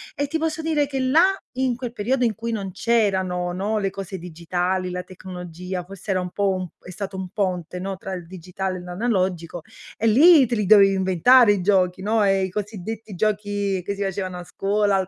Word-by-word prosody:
e 285 - 0
ti 320 +3 -2
posso 320 0 -2
dire 300 -3 +1
che 275 -1 -3
là, 330 +10 +4 0.2
in 260 -2 +1
quel 245 -1 -5
periodo 245 +4 0
in 225 - +1
cui 230 +3 -4
non 195 -4 -3
c'erano, 190 -6 0
no, 200 +4 -1
le 195 -2 -1
cose 195 0 -6
digitali, 180 +2 -2
la 180 0 -4
tecnologia, 180 0 -7
forse 195 +2 -12
era 185 -1 +1
un 180 -1 -5
po' 200 -1 0
un 185 -1 -4
è - - -12
stato 190 +1 -6
un 185 -1 -5
ponte, 180 -5 -2
no, 190 +1 -4
tra 190 0 -6
il 180 -2 -6
digitale 185 +2 -5
e - - -9
l'analogico, 180 -3 -2 0.3
e 225 - 0
lì 285 +4 +7
te 235 - -1
li 210 -3 0
dovevi 195 -1 +6
inventare 200 +6 +5
i 200 - +1
giochi, 185 -1 +2
no, 215 +1 +2
e 195 -1 +3
i - - -5
cosiddetti 210 +2 -6
giochi 205 -1 -1
che 200 - -3
si 200 - -7
facevano 190 -2 -3
a 175 - -7
scuola, 205 +2 0
al 190 -1 0
195 Hz, 210 wpm, -23 LUFS, 180-220 Hz, 0.3 s, lì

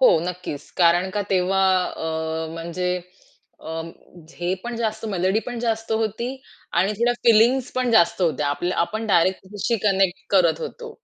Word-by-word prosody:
हो, 255 - +6
नक्कीच 180 -5 -6
कारण 175 +1 +4
का 205 +1 -1
तेव्हा 190 +1 +2 0.2
अ, 160 -1 -3
म्हणजे 170 +2 -4 0.7
अ, 160 +1 -5 0.6
हे 175 +1 0
पण 240 -1 -4
जास्त 220 -1 -2
मेलडी 190 +1 +1
पण 245 -1 -4
जास्त 225 -1 -1
होती 220 +2 -1 0.5
आणि 195 +3 +1
थोड्या 240 +1 +3
फिलिंग्ज 235 +3 +4
पण 255 -1 0
जास्त 180 -5 +4
होत्या. 155 -3 +1
आपल्या 175 +5 -2
आपण 220 +6 -1
डायरेक्ट 185 -2 +3
त्याच्याशी 205 +4 -2
कनेक्ट 195 -2 +2
करत 175 -5 +3
होतो. 475 -1 -6
190 Hz, 150 wpm, -23 LUFS, 175-225 Hz, 0.7 s, हो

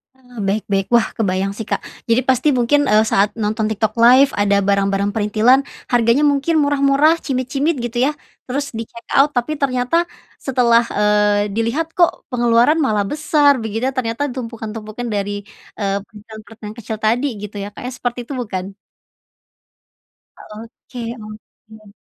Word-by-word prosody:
Eee, 250 -2 -19
baik-baik. 195 -1 -1
Wah, 235 -1 +4
kebayang 195 -1 -1
sih 225 - -5
Kak. - - -2 0.3
Jadi, 230 +2 +4
pasti 260 +3 +3
mungkin, 260 +3 +2
eee, 215 +1 +5
saat 200 0 +2
nonton 215 0 -1
TikTok 220 0 -1
LIVE 255 +4 +5
ada 200 0 +2
barang-barang 200 0 +1
perintilan 225 +5 +3 0.2
harganya 240 +3 +3
mungkin 290 +3 +1
murah-murah, 285 +2 +3
cimit-cimit 270 +3 -1
gitu 240 +1 -1
yah, - - -14 0.3
terus 280 0 -4
di 225 - -3
checkout. 245 +5 0
Tapi, 265 +3 -1
ternyata 275 +3 +1 0.3
setelah, 240 -3 +2
eee, 210 0 +2
dilihat 270 +9 -2
"kok 345 -2 +1
pengeluaran 240 +2 +3
malah 210 -5 0
besar", 295 +1 +3
begitu 225 +4 -2
ternyata 255 +2 -1
tumpukan-tumpukan 225 -1 -6
dari, 205 -1 -3 0.3
eee, 200 -1 0
perintilan-perintilan 215 0 -12
kecil 220 -1 -6
tadi 235 +6 +1
gitu 210 0 -8
ya, 205 - -7
Kak, - - -11
ya. - - -4
Seperti 245 0 -3
itu, - - -6
bukan? 195 -6 -5 1.6
Oke 230 +2 -9
oke. 215 0 -14
230 Hz, 140 wpm, -19 LUFS, 210-260 Hz, 1.6 s, eee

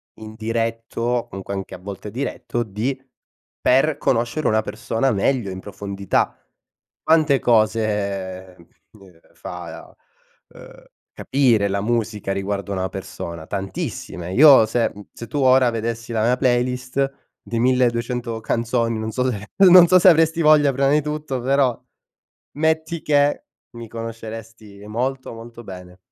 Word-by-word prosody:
indiretto, 115 +1 -4
o 120 0 0
comunque 95 -1 -7
anche 95 -1 -5
a - - -12
volte 100 +2 -8
diretto, 120 -1 -3
di 110 +6 -3 0.6
per 140 +4 +3
conoscere 120 +5 0
una 110 0 +2
persona 115 +4 -1
meglio 110 +1 0
in 95 0 -7
profondità. 100 -1 -2 0.7
Quante 155 -4 +3
cose, 105 -5 0
ehm, 85 - -19 0.2
uhm, 95 -6 -19
fa, - - -9 0.5
uhm, - - -15 0.3
capire 120 -7 +2
la 100 +1 -1
musica 110 -3 -2
riguardo 100 0 -3
a - - -2
una 95 -1 -2
persona? 85 -2 -7
Tantissime. 95 -2 -5
Io 140 -3 +8
se 115 +2 0
mhmm, 100 0 -11
se 115 - -9
tu 145 - -5
ora 130 -1 +5
vedessi 115 +1 -4
la 110 -1 0
mia 125 +2 +3
playlist 125 +2 0 0.3
di 115 -1 -4
1200 120 -2 0
canzoni, 115 -1 -1
non 110 0 -4
so 130 +3 0
se 105 -1 -7 0.2
non 175 -1 +9
so 185 +1 +6
se 185 - +7
avresti 165 0 +3
voglia 150 -3 +5
prima 135 +1 +2
di 150 +1 +3
tutto 150 -3 -4
però, 135 -2 +1 0.8
metti 160 +1 0
che, 145 -1 +2 0.3
mi 115 - -8
conosceresti 115 -2 -9
molto 130 +4 -3
molto 115 +1 -11
bene. 90 -2 -11
115 Hz, 140 wpm, -21 LUFS, 105-130 Hz, 0.8 s, non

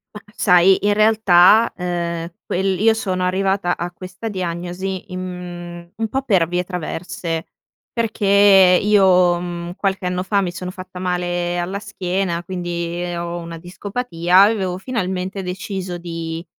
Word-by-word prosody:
Mah 210 - -9
sai, 180 -1 +5
in 205 - +4
realtà, 215 -1 +5
ehm, 170 -2 -3
quel 190 0 -1
io 225 +2 +5
sono 185 -4 -2
arrivata 190 0 0
a 175 +1 -4
questa 185 +5 -7
diagnosi 185 +1 -4
in 185 - -4
mhmm 180 -1 -6 0.4
un 225 0 -1
po' 265 +5 -1
per 190 -10 +2
vie 180 +1 -1
traverse, 170 -2 -4 0.4
perché 200 -4 +5
io, 185 -4 +4
mhmm, 175 0 -5
qualche 195 -1 -2
anno 180 0 -1
fa 200 +1 +1
mi 180 -2 -2
sono 180 +1 -6
fatta 185 -1 -9
male 175 -1 -1
alla 180 +3 -3
schiena, 185 -3 -2
quindi 175 -1 -4
ho 170 0 -4
una 170 0 -7
discopatia, 180 0 +1
avevo 195 -4 +1
finalmente 190 -3 -3
deciso 185 -1 -5
di 165 -1 -5
180 Hz, 140 wpm, -20 LUFS, 175-195 Hz, 0.4 s, sai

